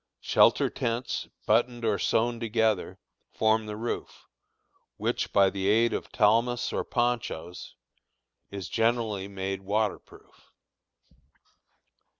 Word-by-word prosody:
Shelter - - +4
tents, 120 +2 -2 0.2
buttoned 120 +2 +1
or 105 -3 +1
sewed 120 +1 +1
together, 110 -3 0 0.3
form 110 0 +1
the 105 - -5
roof, 115 +2 -5 0.7
which, - - -2
by 100 -1 +4
the 95 0 -2
aid 115 +3 +3
of - - -4
talmas 115 +2 +2
or - - -1
ponchoes, 115 -8 -3 0.7
is 100 -2 -6
generally 115 -4 0
made 95 -1 -4
water 105 +2 0
proof. - - -21
110 Hz, 110 wpm, -27 LUFS, 100-115 Hz, 0.7 s, Shelter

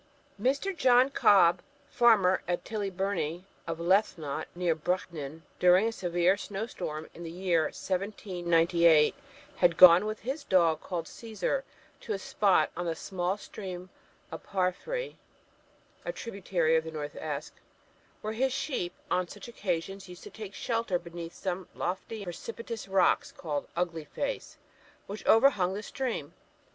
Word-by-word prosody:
Mr. 280 +10 +1
John 255 -2 +5
Cobb, 180 -8 +5 0.3
farmer 210 -7 +4
at 175 0 -2
Tillybirnie, 195 -5 -2
parish - - -30 0.2
of 165 -1 -3
Lethnot, 170 -5 +1
near 175 -1 +1
Brechin, 160 -2 -3 0.2
during 180 +4 +5
a - - 0
severe 175 -1 +1
snow 200 +1 -4
storm 155 -9 -5
in - - -11
the 165 - -6
year 170 -2 +1
1798, 175 -5 +2 0.4
had 175 -2 +3
gone 185 +3 +9
with 215 0 -4
his 270 +5 -4
dog, 170 - +3
called 170 -3 -4
Cæsar, 225 +7 -3 0.4
to 220 - -4
a - - -1
spot 190 -4 +2
on 175 0 -3
the 165 - -1
small 185 +2 -2
stream 185 -3 -8 0.4
of - - -6
Paphry 205 - -2 0.9
(a - - -2
tributary 190 - 0
of 160 - +2
the 160 - -6
North 150 -2 -5
Esk), 150 -1 -5 0.7
where 215 +1 -3
his 260 +4 +1
sheep 255 - -2 0.2
on 180 -1 +1
such - - -10
occasions 195 -3 -3
used 180 0 -11
to - - -10
take 210 -3 -8
shelter 230 -6 0
beneath 170 -1 -8
some 185 -1 -4
lofty 195 +4 -4
and - - -9
precipitous 230 +5 -6
rocks 190 -1 +2
called 150 -4 -4
Ugly 170 -3 -2
Face, 280 - -4 0.5
which 205 +2 -7
overhung 220 -6 +5
the 210 - -5
stream. 220 - -4
185 Hz, 145 wpm, -29 LUFS, 170-215 Hz, 0.9 s, gone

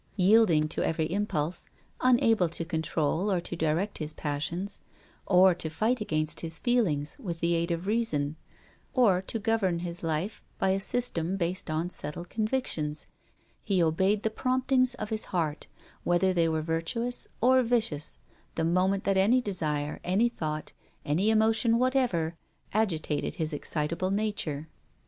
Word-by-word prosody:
Yielding 185 -5 +5
to - - -3
every 160 -1 0
impulse, 180 -5 -1 0.3
unable 230 -7 +4
to 165 0 -2
control 160 +3 0
or 185 - +2
to 175 - -6
direct 165 +6 -1
his 155 -1 -3
passions, 170 +7 -3 0.5
or 185 -1 +6
to 165 -2 -3
fight 220 +9 0
against 155 -7 -1
his 165 -1 -4
feelings 180 - 0
with 170 -4 -5
the 170 +1 +1
aid 170 +1 0
of 170 +1 -2
reason, 160 -10 0 0.6
or 205 -8 +4
to 195 - -3
govern 220 -5 +1
his 170 0 -4
life 165 +6 -2
by 190 - +1
a 190 - +1
system 195 -5 -1
based 175 -1 -2
on 155 +2 -1
settled 175 +2 -6
convictions, 215 - -2 0.6
he 190 -5 +1
obeyed 190 +6 +2
the 220 - 0
promptings 255 +1 +1
of 215 -2 -6
his 220 0 0
heart, 160 -5 -2 0.4
whether 180 +2 +2
they 170 -2 +2
were 160 -1 -1
virtuous 170 +10 -2
or 255 +2 +5
vicious, 225 - 0 0.4
the 160 - 0
moment 185 +3 +2
that 195 -1 +1
any 215 +7 +5
desire, 155 -9 -2
any 200 +7 +2
thought, 155 -8 -4 0.3
any 175 +9 +2
emotion 220 +1 +3
whatever, 245 -11 +1 0.4
agitated 170 -8 0
his 155 -1 -2
excitable 165 +5 -2
nature. 195 -8 -1
180 Hz, 150 wpm, -28 LUFS, 160-220 Hz, 0.6 s, or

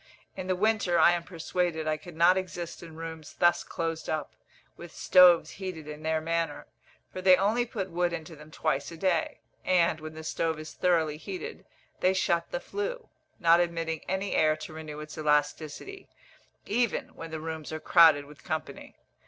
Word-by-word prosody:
In 185 -1 -6
the 185 - +1
winter, 205 -3 +2
I 165 +1 +7
am 175 -1 0
persuaded, 170 -2 -2
I 155 - +1
could 155 +2 -11
not 170 +3 +5
exist 180 -2 -5
in 165 -2 -11
rooms 160 -1 -8
thus 175 0 +3
closed 165 -1 -4
up, 155 -1 -3 0.4
with 170 -1 -11
stoves 180 -2 +6
heated 185 -5 -7
in 150 0 -8
their 160 0 0
manner, 165 +1 -2 0.5
for 185 - -5
they 185 0 +7
only 220 +6 +1
put 195 -5 -4
wood 175 +1 +1
into 160 -1 -6
them 150 +1 -14
twice 140 -1 -1
a 165 - -9
day; 175 -2 0 0.2
and, 170 -3 +2
when 155 0 -8
the 160 - -8
stove 160 0 -1
is 155 0 -8
thoroughly 160 -4 +1
heated, 385 - -7 0.3
they 185 +1 +3
shut 170 -3 +1
the - - -3
flue, 465 +2 -5 0.3
not 170 0 +5
admitting 165 -2 -1
any 190 +1 -2
air 155 -1 +3
to 155 0 -9
renew 155 -1 -7
its 155 0 -9
elasticity, 150 - -1 0.6
even 235 +1 0
when 165 - -9
the 160 0 -5
rooms 160 -1 -6
are 155 - -4
crowded 160 -4 +6
with 145 -3 -15
company. 155 0 -5
165 Hz, 180 wpm, -28 LUFS, 155-185 Hz, 0.6 s, I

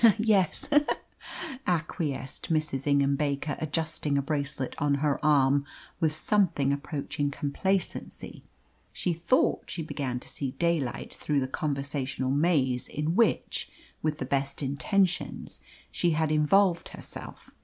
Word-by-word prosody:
"Yes 210 -6 +2
he 295 - +8
he!" 295 - -7 0.8
acquiesced 155 -5 -2
Mrs. 155 -3 0
Ingham 140 -1 +3
Baker, 145 0 -1
adjusting 155 -2 0
a - - +3
bracelet 140 -3 -2
on 145 -1 +2
her 145 0 0
arm 140 -2 +4 0.4
with 160 -3 +3
something 155 -5 +2
approaching 145 0 -2
complacency. 175 +7 -2 0.5
She 180 - -1
thought 170 +10 +1
she 165 - -3
began 135 -5 -3
to - - -12
see 135 -2 -3
daylight 160 -4 -1
through 150 -2 0
the 130 - -1
conversational 140 -2 -2
maze 140 -4 +2
in 150 +2 -1
which 230 +1 +1 0.3
with 155 -1 0
the 130 - -3
best 140 +1 -1
intentions 180 +7 0 0.3
she 175 - +1
had 155 0 +1
involved 170 +4 +3
herself. - - -8
150 Hz, 130 wpm, -28 LUFS, 140-165 Hz, 0.8 s, he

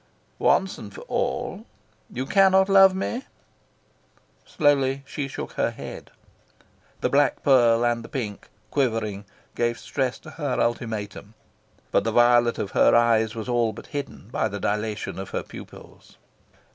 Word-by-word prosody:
"Once 190 -1 +2
and 105 -4 -10
for - - -9
all: - - -3 0.4
you 130 +2 -4
cannot 190 +3 +4
love 195 -1 +7
me?" 235 +7 -3 1.2
Slowly 135 -2 +2
she 140 0 -4
shook 135 - -6
her - - 0
head. - - -9 0.9
The - - +1
black 140 -1 +2
pearl 120 -4 +4
and 120 -1 0
the - - -11
pink, 110 -7 -5 0.2
quivering, 110 -7 -1 0.3
gave 120 0 0
stress 130 -3 -2
to 155 - -11
her 145 -5 -2
ultimatum. 110 -2 -3 0.6
But 100 - +3
the 115 - -1
violet 120 0 +4
of 100 - -3
her - - +4
eyes 115 -1 +3
was 110 +1 -5
all 120 -3 +1
but - - -11
hidden 140 -7 -6
by 125 - 0
the 100 -1 -6
dilation 105 0 -2
of 95 - -6
her - - -3
pupils. - - -13
120 Hz, 145 wpm, -24 LUFS, 110-140 Hz, 1.2 s, love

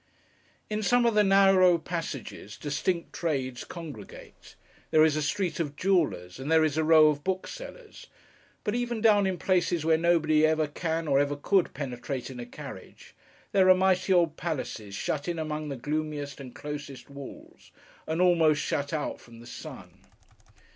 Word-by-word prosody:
In 215 0 -2
some 245 +3 +3
of 230 - +3
the 210 0 +4
narrow 195 -2 +5
passages, 160 - -6
distinct 165 +4 -2
trades 130 -7 -2
congregate. 150 - -11 0.3
There 155 0 +5
is 155 -2 +2
a 155 - 0
street 180 +5 -1
of 145 -3 -3
jewellers, 150 - 0
and 135 +4 -4
there 160 -1 +5
is 155 -2 +1
a 160 - +1
row 155 -1 +6
of 145 -1 -2
booksellers; 430 - -6 0.6
but 210 - -1
even 240 -1 -2
down 210 -3 +4
in 185 -1 -2
places 175 -4 0
where 160 0 +3
nobody 160 -2 +3
ever 155 0 +3
can, 160 +2 -3
or 140 -1 +3
ever 145 0 +1
could, 185 +5 +1
penetrate 130 -1 -5
in 125 - -9
a 120 - -7
carriage, - - -11 0.4
there 190 -2 +4
are 185 - +8
mighty 185 0 +2
old 170 -4 +3
palaces 120 - -4
shut 145 - -3
in 170 -1 -2
among 155 -1 -4
the 140 - -4
gloomiest 145 +1 -4
and 130 -3 -10
closest 145 -2 -7
walls, 140 -1 -12 0.4
and 160 +2 -2
almost 165 -4 +4
shut 140 -1 -2
out 150 -2 -3
from 115 -1 -15
the 120 - -13
sun. - - -10
155 Hz, 170 wpm, -28 LUFS, 145-185 Hz, 0.6 s, are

